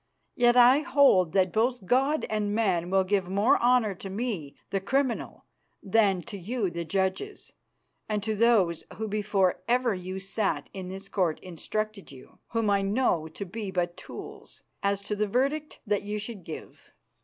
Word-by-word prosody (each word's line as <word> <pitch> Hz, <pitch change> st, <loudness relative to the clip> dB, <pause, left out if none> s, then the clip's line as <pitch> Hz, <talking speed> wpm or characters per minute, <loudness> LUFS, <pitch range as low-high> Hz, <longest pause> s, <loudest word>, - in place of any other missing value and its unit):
Yet 240 Hz, 0 st, +4 dB
I 250 Hz, +3 st, +7 dB
hold 265 Hz, -, +4 dB
that 185 Hz, -2 st, +2 dB
both 235 Hz, -1 st, +1 dB
God 270 Hz, +8 st, +2 dB
and 210 Hz, -1 st, -1 dB
man 185 Hz, -6 st, +1 dB
will 190 Hz, 0 st, +3 dB
give 190 Hz, -1 st, 0 dB
more 200 Hz, +4 st, +3 dB
honour 240 Hz, -4 st, +3 dB
to 190 Hz, +2 st, -9 dB
me 195 Hz, -, -4 dB, 0.2 s
the 195 Hz, -, 0 dB
criminal 260 Hz, +4 st, -1 dB, 0.4 s
than 195 Hz, -3 st, +2 dB
to 210 Hz, -4 st, -8 dB
you 205 Hz, 0 st, -2 dB
the 170 Hz, 0 st, -4 dB
judges, 190 Hz, -, -2 dB, 0.6 s
and 210 Hz, -2 st, -1 dB
to 220 Hz, 0 st, -1 dB
those 205 Hz, -7 st, +3 dB
who 220 Hz, +1 st, -4 dB
before 200 Hz, -3 st, +1 dB
ever 245 Hz, -1 st, +2 dB
you 185 Hz, 0 st, -5 dB
sat 195 Hz, +2 st, -2 dB
in 190 Hz, -2 st, -6 dB
this 195 Hz, +1 st, -8 dB
Court 180 Hz, -6 st, 0 dB
instructed 200 Hz, +3 st, -4 dB
you, 130 Hz, -2 st, -15 dB
whom 225 Hz, -2 st, -1 dB
I 200 Hz, 0 st, +3 dB
know 195 Hz, -6 st, +1 dB
to 200 Hz, +5 st, -7 dB
be 205 Hz, +2 st, -5 dB
but 175 Hz, -2 st, -1 dB
tools, -, -, -10 dB, 0.2 s
as 200 Hz, 0 st, 0 dB
to 210 Hz, +1 st, -3 dB
the 210 Hz, +1 st, 0 dB
verdict 280 Hz, +7 st, -1 dB
that 205 Hz, -1 st, +1 dB
you 205 Hz, +1 st, -4 dB
should 210 Hz, -2 st, -6 dB
give." 160 Hz, -, -10 dB
205 Hz, 170 wpm, -27 LUFS, 185-235 Hz, 0.6 s, I